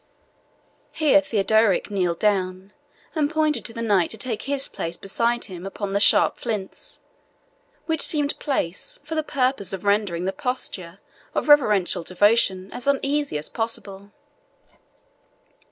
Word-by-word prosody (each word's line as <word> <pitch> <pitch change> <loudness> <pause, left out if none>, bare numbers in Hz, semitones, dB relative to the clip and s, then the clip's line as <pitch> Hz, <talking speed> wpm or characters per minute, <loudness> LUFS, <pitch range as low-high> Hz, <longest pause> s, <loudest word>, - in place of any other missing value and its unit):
Here 295 -2 +4
Theodorick 220 -5 +2
kneeled 180 -4 0
down, 190 -1 -1 0.4
and 300 -3 +1
pointed 310 -1 0
to - - -4
the 230 0 -4
knight 200 -6 +2
to 220 - -4
take 225 0 -3
his 275 0 0
place 165 +1 -4
beside 235 +4 0
him 180 -2 -9
upon 195 +1 -5
the 200 - +2
sharp 205 - +4
flints, 210 -5 -5 0.8
which 320 -2 -1
seemed 295 -2 +2
placed 265 - -3
for 315 - -5
the 315 - +1
purpose 255 - -1
of 190 +1 -6
rendering 200 -4 +1
the 190 - -1
posture 230 -10 -4 0.4
of - - -1
reverential 210 -12 +4
devotion 190 +1 +2
as 250 - -5
uneasy 280 - 0
as 150 - -3
possible. 205 -3 -4
210 Hz, 135 wpm, -23 LUFS, 190-275 Hz, 0.8 s, Here